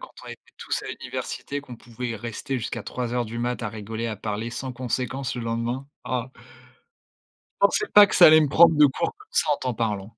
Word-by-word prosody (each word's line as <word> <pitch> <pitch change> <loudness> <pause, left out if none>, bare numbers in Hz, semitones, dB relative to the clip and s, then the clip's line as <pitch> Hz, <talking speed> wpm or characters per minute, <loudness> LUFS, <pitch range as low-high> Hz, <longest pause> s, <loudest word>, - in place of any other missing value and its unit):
quand - - -11
on - - -10
était - - -9 0.2
tous - - -3
à - - -8
l'université, 145 0 -5
qu'on 125 -4 -11
pouvait 120 0 -6
rester 120 +4 -4
jusqu'à 115 -1 -5
03:00 125 -1 -3
du 115 +2 -6
mat' 120 0 -2
à 110 - -2
rigoler, 110 +2 -5
à 110 - -4
parler 110 +2 -4
sans 130 +2 -5
conséquence 125 +1 -3
le 120 - -5
lendemain, 115 +4 -3 0.2
ah! 125 0 -3 1.3
Je - - +7
pensais 425 - -1
pas 205 0 +10
que - - -3
ça 175 - +9
allait 155 0 +8
me 150 - +1
prendre 165 +2 +6
de 150 0 +7
court, 135 - -1
comme 420 +1 -18
ça, - - +1
en - - -3
t'en 125 -2 -3
parlant. 105 -2 -3
120 Hz, 220 wpm, -24 LUFS, 115-135 Hz, 1.3 s, pas